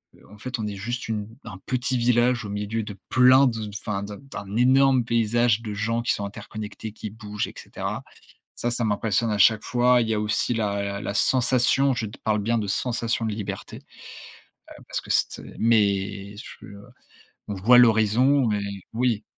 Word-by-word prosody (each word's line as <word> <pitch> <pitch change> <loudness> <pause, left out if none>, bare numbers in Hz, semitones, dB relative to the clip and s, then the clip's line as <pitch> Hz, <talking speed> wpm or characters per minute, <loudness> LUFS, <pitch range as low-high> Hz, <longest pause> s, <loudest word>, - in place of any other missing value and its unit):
heu, - - -21
en 105 - -13
fait, 130 +4 -5
on 110 - -2
est 105 - -5
juste 120 +5 -4
une 105 -2 -3 0.2
un 105 -6 -9
petit 130 0 -1
village 120 0 +2
au - - -6
milieu 105 +2 -3
de 105 -1 -8
plein 130 +2 +6
de, 115 -3 -3
enfin 105 -1 -4
d'un 100 0 -7
d'un 105 -7 -8
énorme 130 +1 +4
paysage 115 0 +1
de 110 -3 -5
gens 115 +3 -1
qui 120 - +1
sont 100 - -4
interconnectés, 105 +1 -8
qui 110 - -7
bougent, 105 -1 -5
et - - -11
cetera. - - -5 0.5
Ça, 120 - -2
ça 120 -1 0
m'impressionne 110 +2 0
à 105 - 0
chaque 105 +3 +5
fois. 125 0 +3
Il 115 - -1
y - - +1
a - - 0
aussi 105 +3 0
la 100 -2 -2
la 100 - -4
sensation. 130 +3 +3
Je 115 -2 -3
te 105 - -11
parle 110 -1 +1
bien 115 +3 0
de 105 - -3
sensation 115 +2 -1
de 110 - -1
liberté, 105 -2 -6 0.9
heu, - - -13
parce - - -3
que - - -13
c'était - - -1
mais 100 -2 +1
ch 120 - -10
heu, 100 0 -11 0.7
on 105 - -3
voit 110 +7 +5
l'horizon 120 +4 +4
mais 105 -1 0 0.3
oui, 115 -2 0
110 Hz, 190 wpm, -24 LUFS, 105-120 Hz, 0.9 s, plein